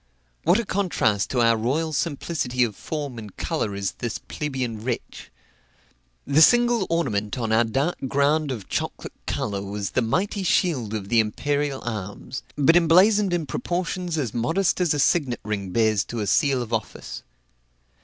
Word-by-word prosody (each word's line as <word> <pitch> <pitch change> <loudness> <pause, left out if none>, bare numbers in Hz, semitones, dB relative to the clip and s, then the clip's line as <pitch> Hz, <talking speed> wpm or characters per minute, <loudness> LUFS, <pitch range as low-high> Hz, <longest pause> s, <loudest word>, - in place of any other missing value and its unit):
What 175 +5 +5
a 235 - -2
contrast 180 - 0
to 125 - +1
our 115 0 +5
royal 145 +8 -1
simplicity 140 -4 -1
of 110 -4 -1
form 145 -4 -5
and 105 -3 -11
color 100 - -2
is 100 -1 -2
this 120 -2 -3
plebeian 130 -7 -4
wretch! 120 -1 -5 1.0
The 145 +3 +3
single 240 +1 +5
ornament 115 -11 -1
on 115 -3 -2
our 110 +1 +5
dark 135 +9 -1
ground 145 +3 +2
of 115 -8 -5
chocolate - - -4
color 100 -2 -2
was 100 -1 -4
the - - +1
mighty 190 - 0
shield 140 - +1
of 100 -2 -5
the 115 - +4
imperial 140 +6 -1
arms, 110 +3 -5
but 145 +3 +4
emblazoned 185 +4 +5
in 175 -3 0
proportions 175 +4 -2
as 125 -8 -2
modest 165 +11 +1
as 170 -4 +2
a - - -1
signet 140 -4 +2
ring 100 -3 -3
bears 110 0 +2
to 120 - -5
a 105 - -1
seal 135 +3 +2
of 120 0 -8
office. 110 -2 -4
130 Hz, 165 wpm, -24 LUFS, 110-165 Hz, 1.0 s, What